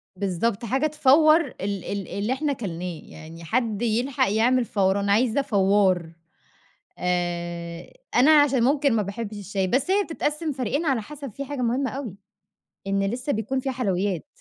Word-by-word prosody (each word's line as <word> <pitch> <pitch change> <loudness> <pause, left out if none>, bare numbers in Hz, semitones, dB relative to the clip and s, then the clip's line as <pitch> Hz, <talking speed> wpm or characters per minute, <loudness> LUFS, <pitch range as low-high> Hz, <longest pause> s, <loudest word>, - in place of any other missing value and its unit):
بالضبط. 200 +4 -1
حاجة 270 +7 +1
تفوّر 310 +2 +5
ال - - -12 0.2
ال 200 -1 -4
اللي 210 +5 -2
إحنا 285 +1 -1
كلناه، 180 -7 -5
يعني 165 +2 -12
حدّ 225 +3 -1
يلحق 240 -1 +1
يعمل 240 +3 +2
فوَران، 200 0 +1
عايزة 230 +5 +3
فوّار. 195 -6 +2 0.9
آآ 175 - -3 0.2
أنا 260 +5 +6
عشان 265 -4 +2
ممكن 280 +1 +3
ما 220 - +2
باحبش 205 +2 -5
الشاي، 195 -1 -2
بس 265 - 0
هي 400 +1 +3
بتتقسم 310 -1 -2
فريقين 275 +4 -2
على 260 -6 +1
حسب 280 -1 -9
في 280 - -6
حاجة 280 -1 -5
مهمّة 255 +3 0
أوي 260 -8 -6 0.7
إن 195 0 +1
لسّه 245 +8 -2
بيكون 225 +5 -2
فيها 265 0 -2
حلويّات. 195 -7 -1
230 Hz, 155 wpm, -24 LUFS, 195-270 Hz, 0.9 s, أنا